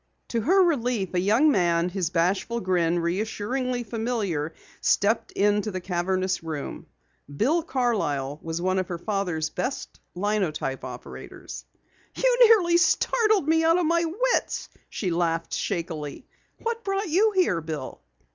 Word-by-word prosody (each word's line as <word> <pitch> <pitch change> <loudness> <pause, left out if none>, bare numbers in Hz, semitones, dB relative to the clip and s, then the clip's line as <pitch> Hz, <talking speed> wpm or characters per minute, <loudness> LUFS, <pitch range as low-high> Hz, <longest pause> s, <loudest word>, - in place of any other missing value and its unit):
To 230 - 0
her 375 - +4
relief, 245 - 0
a 180 - +2
young 225 +11 +4
man, 175 -4 +2
his 180 -3 -2
bashful 185 +7 0
grin 175 -4 +1
reassuringly 220 +8 -2
familiar, 215 -9 -2 0.3
stepped 215 +3 +2
into 205 +1 +2
the 185 -2 -4
cavernous 185 +1 -1
room. 155 -4 -6 0.5
Bill 305 - +2
Carlyle 200 - -1
was 165 0 -4
one 185 +2 +1
of 185 - -2
her 175 - -4
father's 175 -5 -2
best 265 +2 -4 0.2
linotype 180 -10 -1
operators. 125 -1 -9 0.5
"You - - +2
nearly 360 -7 +5
startled 430 - +2
me 320 +1 +3
out 330 +1 +4
of 360 - +1
my 335 +1 +2
wits," 475 +10 -1 0.2
she 185 -5 -3
laughed 165 -1 -1
shakily, 160 - -3 0.4
"What 465 0 -2
brought 390 0 -1
you 415 +7 +3
here, 205 - +2
Bill?" 155 -4 -6
200 Hz, 135 wpm, -25 LUFS, -, 0.5 s, nearly